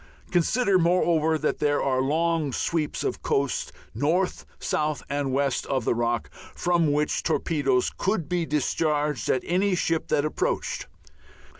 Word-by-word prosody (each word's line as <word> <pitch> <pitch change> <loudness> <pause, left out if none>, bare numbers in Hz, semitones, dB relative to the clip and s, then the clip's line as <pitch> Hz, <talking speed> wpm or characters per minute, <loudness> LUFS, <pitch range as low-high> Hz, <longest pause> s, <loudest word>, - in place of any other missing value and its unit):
Consider, 190 +3 +3
moreover, 165 -2 +2
that 155 0 -1
there 145 -1 +2
are 130 -1 +1
long 160 +1 +1
sweeps 160 +1 -1
of - - -2
coast 140 -1 -1 0.2
north, 165 - 0
south, 150 -1 -1
and 140 -1 -1
west 135 0 0
of 130 -4 -1
the - - +2
Rock, 120 0 -1 0.2
from 170 -4 +2
which 150 +1 0
torpedoes 135 -6 +1
could 190 -6 -1
be 175 0 -1
discharged 150 -3 0
at 130 - +1
any 185 +2 +1
ship 165 -2 0
that 145 - +1
approached. 155 - -2
150 Hz, 140 wpm, -26 LUFS, 140-170 Hz, 0.2 s, Consider